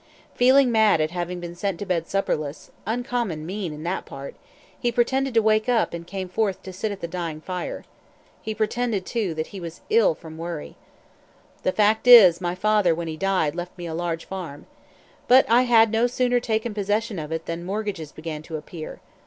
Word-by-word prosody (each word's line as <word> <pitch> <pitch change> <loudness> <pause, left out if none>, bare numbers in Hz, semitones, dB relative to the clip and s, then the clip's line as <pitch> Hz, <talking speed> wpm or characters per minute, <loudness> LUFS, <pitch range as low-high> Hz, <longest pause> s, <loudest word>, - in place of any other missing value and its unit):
Feeling 260 +1 +5
mad 220 -6 +4
at 155 +1 0
having 175 0 -4
been 175 -1 -7
sent 185 +1 -2
to 205 - -5
bed 170 -4 -1
supperless 155 -6 -2 0.2
uncommon 235 -8 -2
mean 190 -1 -4
in 150 +1 -8
that 175 +3 -2
part 140 0 -8 0.5
he 240 - 0
pretended 260 +2 +1
to 225 - +5
wake 215 +2 +2
up 235 -7 +2
and 170 0 -6
came 190 0 -5
forth 195 +1 -1
to 190 - -8
sit 205 +3 -3
at 200 - -7
the 170 - -3
dying 165 -3 -4
fire. 180 +2 -5 0.6
He 220 -1 -4
pretended, 220 -2 -1
too, 210 -9 -2
that 155 0 -2
he 195 - -6
was 170 -1 -8
ill 465 +3 +4
from 160 0 -11
worry. 165 - -6 0.9
"The 185 - +1
fact 215 +4 +2
is, 190 -8 +9
my 175 0 -2
father, 205 -3 +2
when 170 0 -4
he 160 - -4
died, 185 -4 0
left 175 +2 -6
me 175 - -6
a 165 - -5
large 165 0 -3
farm. 175 -7 -7 0.6
But 255 +2 +6
I 235 +2 +5
had 225 -2 +6
no 225 +2 +3
sooner 245 0 +1
taken 220 -1 -2
possession 205 0 -1
of 150 0 -6
it 160 0 -3
than 170 +1 -4
mortgages 195 -5 -4
began 155 -1 -6
to 160 0 -6
appear. 155 +1 -9
190 Hz, 200 wpm, -24 LUFS, 165-220 Hz, 0.9 s, is